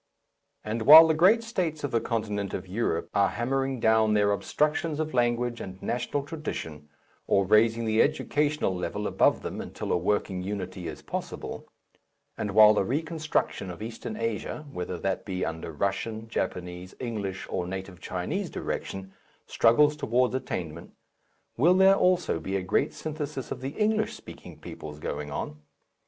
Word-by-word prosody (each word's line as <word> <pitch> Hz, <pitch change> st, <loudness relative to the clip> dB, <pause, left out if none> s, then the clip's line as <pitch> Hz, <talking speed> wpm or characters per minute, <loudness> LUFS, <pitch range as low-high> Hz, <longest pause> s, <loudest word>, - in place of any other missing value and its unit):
And 110 Hz, +2 st, -3 dB
while 160 Hz, +3 st, +12 dB
the 160 Hz, -, +3 dB
great 190 Hz, +9 st, +5 dB
states 175 Hz, -9 st, -2 dB
of 145 Hz, -, -2 dB
the 115 Hz, -, +1 dB
continent 105 Hz, -4 st, -2 dB
of 95 Hz, 0 st, -6 dB
Europe 90 Hz, -4 st, -2 dB
are 100 Hz, -2 st, +3 dB
hammering 135 Hz, +4 st, -1 dB
down 110 Hz, -1 st, +3 dB
their 105 Hz, -1 st, +3 dB
obstructions 150 Hz, -, 0 dB
of 155 Hz, 0 st, -2 dB
language 120 Hz, -1 st, +1 dB
and 95 Hz, 0 st, -8 dB
national 125 Hz, +6 st, -2 dB
tradition 80 Hz, -, -6 dB, 0.4 s
or 100 Hz, -1 st, +3 dB
raising 115 Hz, +3 st, +3 dB
the 110 Hz, 0 st, +3 dB
educational 150 Hz, -6 st, +1 dB
level 100 Hz, +3 st, -3 dB
above -, -, +2 dB
them -, -, -4 dB
until -, -, -5 dB
a -, -, +3 dB
working 95 Hz, 0 st, 0 dB
unity 95 Hz, -2 st, -5 dB
is 80 Hz, -, -7 dB
possible, -, -, -6 dB, 0.7 s
and 105 Hz, -, -3 dB
while 110 Hz, 0 st, +9 dB
the 105 Hz, -, +2 dB
reconstruction 155 Hz, -, -1 dB
of 90 Hz, +4 st, -7 dB
Eastern 115 Hz, -1 st, -6 dB
Asia 115 Hz, +6 st, -3 dB
whether 90 Hz, -5 st, -4 dB
that 95 Hz, +2 st, -2 dB
be 95 Hz, -2 st, -3 dB
under 80 Hz, 0 st, -5 dB
Russian, 110 Hz, +7 st, -2 dB
Japanese, 90 Hz, -3 st, -4 dB
English, 105 Hz, -6 st, -4 dB
or 90 Hz, -, -3 dB
native 95 Hz, -1 st, -6 dB
Chinese -, -, -3 dB
direction 95 Hz, 0 st, -5 dB, 0.3 s
struggles 145 Hz, +6 st, +4 dB
towards 125 Hz, -3 st, +1 dB
attainment, 85 Hz, -10 st, -5 dB, 0.6 s
will 170 Hz, +9 st, +5 dB
there 190 Hz, +1 st, +7 dB
also 180 Hz, -, +2 dB
be 95 Hz, +3 st, -4 dB
a 95 Hz, -, -1 dB
great 90 Hz, -, +1 dB
synthesis 150 Hz, -4 st, -5 dB
of -, -, -5 dB
the 135 Hz, +2 st, -5 dB
English 215 Hz, 0 st, +1 dB
speaking -, -, -12 dB
peoples 75 Hz, -1 st, -9 dB
going 75 Hz, -1 st, -4 dB
on? 75 Hz, +1 st, -5 dB
110 Hz, 155 wpm, -27 LUFS, 95-145 Hz, 0.7 s, while